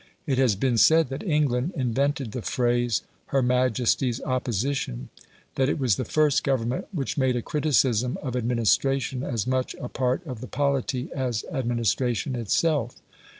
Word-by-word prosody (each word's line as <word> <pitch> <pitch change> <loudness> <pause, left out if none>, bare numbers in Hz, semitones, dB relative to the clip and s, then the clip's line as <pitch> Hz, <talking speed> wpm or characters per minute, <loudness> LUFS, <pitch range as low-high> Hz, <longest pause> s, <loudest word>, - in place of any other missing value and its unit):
It 135 -5 0
has 125 -6 +3
been 120 +3 +1
said 160 0 +5
that 135 +1 -5
England 150 - 0
invented 135 0 0
the 120 - -4
phrase, 120 - 0 0.2
"Her 135 -1 +1
Majesty's 125 0 +1
Opposition"; 125 - -2 0.4
that 135 0 +1
it - - 0
was 130 -8 +2
the 130 - -3
first 150 +3 +2
Government 130 -2 -1
which 145 -5 -3
made 130 -2 +2
a 120 - -2
criticism 130 -5 +1
of 130 -3 -3
administration 125 +2 +1
as 120 -6 -2
much 130 0 -1
a 125 - -7
part 130 +6 -1
of 125 -7 -7
the 130 - -6
polity 135 -2 -1
as 125 -5 -2
administration 120 - 0
itself. 120 +3 0
130 Hz, 150 wpm, -25 LUFS, 120-140 Hz, 0.4 s, said